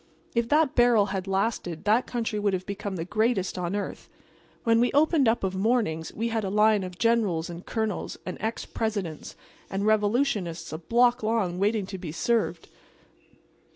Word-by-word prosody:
If 235 0 0
that 300 -2 +3
barrel 240 -4 +5
had 190 0 -3
lasted 190 -4 -1
that 220 +4 +2
country 225 -3 -2
would 205 -1 +1
have 185 0 -2
become 200 -1 -4
the 165 -2 -4
greatest 210 -1 0
on 180 +1 -2
earth. 205 - -5 0.5
When 230 0 +4
we 245 - +3
opened 295 -2 +4
up 225 0 +2
of 190 -1 0
mornings 190 -6 0
we 230 +2 -2
had 225 -1 -1
a 195 - -2
line 210 0 +3
of 180 -1 -7
Generals 205 -8 +1
and 170 +1 -8
Colonels 220 -4 -3
and 185 - -4
ex 220 +3 -3
Presidents 200 -8 -4 0.3
and 195 +1 -2
revolutionists 210 - +1
a 155 - -4
block 240 +7 +3
long 215 -5 0
waiting 205 0 +1
to 190 0 -7
be 170 -4 -6
served. 230 +8 0
210 Hz, 175 wpm, -26 LUFS, 185-230 Hz, 0.5 s, barrel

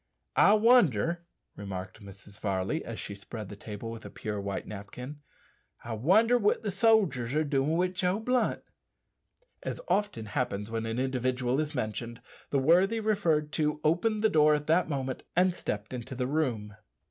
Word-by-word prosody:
"I 205 - +6
wonder," 175 - +4 0.3
remarked 95 0 -7
Mrs. 100 0 -13
Varley, 100 +9 -1
as 115 - -6
she - - -5
spread 100 +1 -8
the 105 - -8
table 105 +2 -7
with 115 -1 -8
a - - -8
pure 105 -1 -4
white 100 0 -4
napkin 125 +8 -8 0.6
"I 115 - -5
wonder 210 - +4
what 210 +1 +2
the 205 - -1
sodgers 185 - +2
are 155 - +3
doin' 145 +2 +1
wi' 180 +1 +2
Joe 180 +1 0
Blunt." 250 +2 0 1.0
As - - -4
often 205 - 0
happens 105 -1 -2
when 115 0 -2
an 115 +1 -3
individual 130 0 0
is 150 -1 -2
mentioned, 115 0 -3 0.3
the 140 - +1
worthy 180 +11 +4
referred 175 -9 +1
to 150 -1 0
opened 210 +7 +1
the 220 - +5
door 155 -4 +5
at 150 0 -3
that 165 +2 +2
moment 135 -3 -3
and 180 +1 +4
stepped 105 - -4
into 125 +1 -6
the 125 0 -1
room. 125 -8 -1
135 Hz, 170 wpm, -29 LUFS, 110-180 Hz, 1.0 s, I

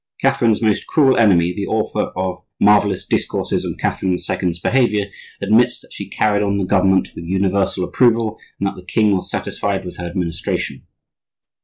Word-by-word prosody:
Catherine's 115 -1 +2
most 110 -2 +1
cruel 135 -4 +4
enemy, 90 -6 +4
the 100 +2 -4
author 110 -1 -1
of 90 -1 -2 0.2
"Marvellous 100 -2 +3
Discourses - - -1
on - - -4
Catherine 95 -1 0
the - - 0
Second's 90 -1 -3
Behavior" 105 -3 +1 0.3
admits 115 +3 +2
that - - -18
she - - -7
carried 105 -1 +1
on 100 -1 0
the 100 - -1
government 95 0 +2
with 85 - -8
universal 95 +1 0
approval 115 0 +1 0.2
and - - -1
that 100 - -2
the 90 - -11
king 105 +3 +2
was 90 - -4
satisfied 100 -2 -3
with 90 - -8
her 90 - -5
administration. 85 -2 -3
100 Hz, 170 wpm, -19 LUFS, 90-110 Hz, 0.3 s, cruel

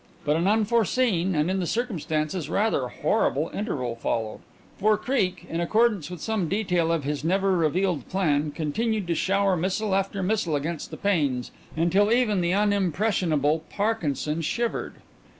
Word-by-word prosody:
But 150 +1 +2
an 170 +3 +1
unforeseen 215 -3 +2
and 150 +4 +1
in 190 - 0
the 180 - -1
circumstances 165 - -2
rather 200 - +1
horrible 145 +5 0
interval 130 - -3
followed, 115 -1 -2 0.4
for 210 +1 +3
Creake, 195 -8 -1
in 165 +1 -2
accordance 210 -3 +2
with 180 -2 -7
some 215 -7 -1
detail 180 -5 +1
of 165 -3 0
his 145 0 -3
never 190 +3 +2
revealed 170 -2 0
plan, 155 -6 +1
continued 200 +8 -1
to 175 - 0
shower 195 +3 +2
missile 190 +4 -1
after 195 0 0
missile 185 -5 0
against 155 +3 -3
the - - -8
panes 145 -11 0 0.3
until 190 +6 +3
even 225 -6 +2
the 170 0 +1
unimpressionable 185 -6 +1
Parkinson 165 - -1
shivered. 235 +9 -2
180 Hz, 150 wpm, -25 LUFS, 155-205 Hz, 0.4 s, for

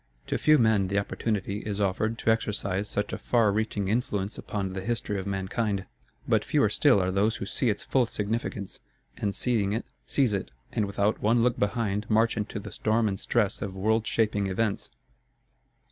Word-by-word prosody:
To - - -1
few 155 0 +5
men 110 -6 +3
the 100 +2 -1
opportunity 100 0 -1
is 105 -1 -4
offered 105 +3 0
to 110 - +2
exercise 105 -3 -1
such 105 0 -2
a - - -3
far 115 -4 +3
reaching 105 -1 -1
influence 105 -2 -1
upon 95 -3 -4
the 95 - -4
history 105 -1 -1
of 95 - -5
mankind; 100 +1 -1 0.4
but - - +3
fewer - - +2
still 100 - +4
are 95 0 0
those 105 +4 +2
who - - -4
see 120 +4 0
its 105 - -1
full 130 -3 +2
significance, 105 -2 -3 0.4
and 100 -1 -2
seeing 105 -5 +1
it, 115 - -2 0.2
seize 130 -7 +2
it, 95 -9 -2 0.2
and 105 - 0
without 100 +1 0
one 115 +2 +3
look 120 0 +1
behind 105 -1 -1
march 110 +2 +3
into 105 0 -3
the 105 0 -8
storm 110 +4 +1
and 95 -1 -2
stress 105 -4 0
of 95 -2 -4
world 110 +3 +1
shaping 105 -3 +1
events. 100 +2 -1
105 Hz, 185 wpm, -27 LUFS, 100-115 Hz, 0.4 s, few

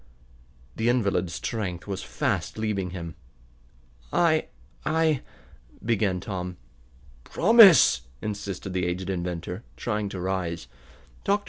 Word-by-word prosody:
The 115 +2 +2
invalid's 100 -8 +1
strength 95 -6 -3
was 100 -2 -4
fast - - -2
leaving 105 -4 -1
him. 85 -2 -6 1.0
"I 160 -2 +3 0.4
I 160 -3 +2 0.3
," - - -22
began 105 -5 +1
Tom. 90 -2 -5 0.7
"Promise!" 195 - +7 0.2
insisted 100 -2 -5
the 90 -1 0
aged 90 +2 -2
inventor, 90 +2 -4
trying 105 -3 -2
to 95 - -6
rise. 90 -3 -2 0.6
Dr. 200 +1 +2
95 Hz, 110 wpm, -26 LUFS, 90-115 Hz, 1.0 s, Promise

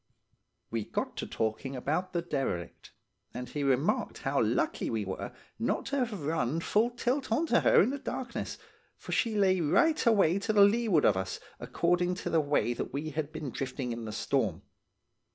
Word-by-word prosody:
"We 115 -2 -1
got - - -3
talking 110 +5 -2
about 160 +8 -1
the 170 -2 -1
derelict, 135 - -3 0.4
and 125 0 -5
he 145 - -4
remarked 135 +1 +1
how - - +1
lucky - - 0
we 110 -3 -1
were 95 0 -5 0.3
not - - 0
to 280 +1 -2
have 215 -7 -5
run 155 -1 0
full 215 +7 +2
tilt 250 +2 -2
on 275 +9 +2
to - - +3
her 475 - +5
in - - 0
the 285 - -4
darkness, 250 -3 -4 0.4
for - - -9
she 230 -3 +1
lay 190 -3 +3
right 310 - +3
away 195 -5 +4
to 215 +2 -1
leeward 200 -5 +5
of 100 - +5
us, 95 0 -3 0.2
according, 175 +1 +1
to - - -4
the 165 - +4
way 145 -4 +1
that - - -4
we 150 +3 -3
had 155 0 -3
been 155 -4 -5
drifting 130 -1 -4
in 115 -1 -5
the 110 - -5
storm. - - -1
160 Hz, 180 wpm, -30 LUFS, 130-215 Hz, 0.4 s, her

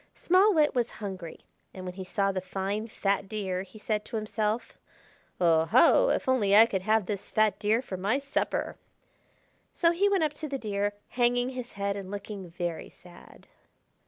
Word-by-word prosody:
Small 375 +4 +4
Wit 300 -2 +3
was 245 -3 0
hungry, 190 -5 -7 0.3
and 185 -1 -7
when 180 - -5
he 190 +1 -7
saw 195 +1 0
the 190 -1 -3
fine 195 +4 -3
fat 200 -2 -1
Deer 190 -4 -2
he 195 +3 -12
said 210 0 -2
to - - -7
himself: 215 +1 -2 0.6
"Oho! 180 - +5
if - - 0
only 215 -7 +3
I 220 +2 +9
could 195 -5 -2
have 215 +1 +2
this 200 0 -5
fat 215 -1 +2
Deer 220 +4 +1
for 190 - -6
my 200 +8 +1
supper!" 275 0 -2 1.0
So 335 -1 +3
he 390 +4 +2
went 390 -4 +2
up 300 -1 0
to 310 - -3
the 275 -1 -3
Deer, 205 -3 -2 0.2
hanging 245 0 +1
his 250 -2 -7
head 200 0 -2
and 195 -2 -7
looking 200 -2 -7
very 170 -1 -4
sad. 175 -1 -17
210 Hz, 180 wpm, -28 LUFS, 190-245 Hz, 1.0 s, I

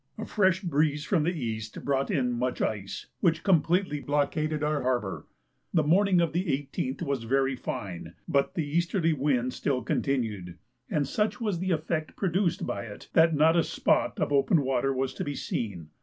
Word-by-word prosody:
A - - -4
fresh 190 -3 +2
breeze 150 -4 +1
from 180 -6 +2
the - - +3
east 110 -3 -5
brought 140 -1 +1
in 125 -4 +1
much 125 +1 -1
ice, 100 -3 -3
which 165 -3 +2
completely 175 -3 +2
blockaded 150 +2 0
our 150 0 +1
harbour. 120 -6 -1 0.5
The 160 - +4
morning 185 +4 +4
of 170 - 0
the 180 +3 0
18th 135 -1 -2
was 140 -6 -2
very 135 +2 +1
fine, 90 -8 -6
but 140 -1 +1
the 165 - 0
easterly 170 +2 +1
wind 130 -3 0
still 130 -4 -1
continued, 110 - -2 0.3
and 145 -3 0
such 210 - 0
was 210 -7 -1
the 185 +1 -2
effect 155 -1 -1
produced 185 -1 0
by 100 - -3
it 105 -2 -10
that 160 0 +5
not 160 +3 +5
a 170 - +4
spot - - +1
of - - 0
open 140 +2 +3
water 135 0 +1
was 130 0 -1
to - - -4
be 145 -1 -3
seen. 90 - -4
145 Hz, 180 wpm, -28 LUFS, 125-165 Hz, 0.5 s, that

